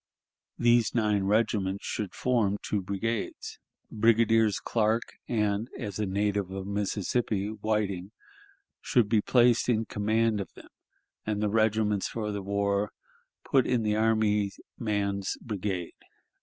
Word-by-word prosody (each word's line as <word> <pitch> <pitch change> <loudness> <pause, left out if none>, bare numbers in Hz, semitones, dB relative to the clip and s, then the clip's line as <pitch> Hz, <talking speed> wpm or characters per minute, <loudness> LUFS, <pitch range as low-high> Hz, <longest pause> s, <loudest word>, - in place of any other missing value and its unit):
These 120 -1 +3
nine 105 -4 +2
regiments 100 -2 +1
should 105 -4 -4
form 115 -6 +1
two 105 - -1
brigades. 100 +4 -3 0.3
Brigadiers 115 -1 +3
Clark 110 0 +1 0.2
and 105 0 0
(as 105 -4 -5
a 105 - 0
native 100 0 0
of 95 0 -5
Mississippi) 100 +1 -1
Whiting 105 -3 -2 0.7
should 120 -4 +2
be 110 0 +3
placed 120 +1 +3
in 115 -2 +2
command 110 +1 +1
of 95 - -7
them, - - -14 0.5
and 105 -1 -2
the 105 0 +1
regiments 110 -2 +1
for 105 -2 -3
the 100 -1 -3
war 100 +1 0 0.5
put 135 -3 +3
in 125 -3 +1
the 105 -1 +1
army 110 -2 +2 0.3
man's 100 -3 -1
brigade. 95 -5 -4
105 Hz, 130 wpm, -28 LUFS, 100-115 Hz, 0.7 s, These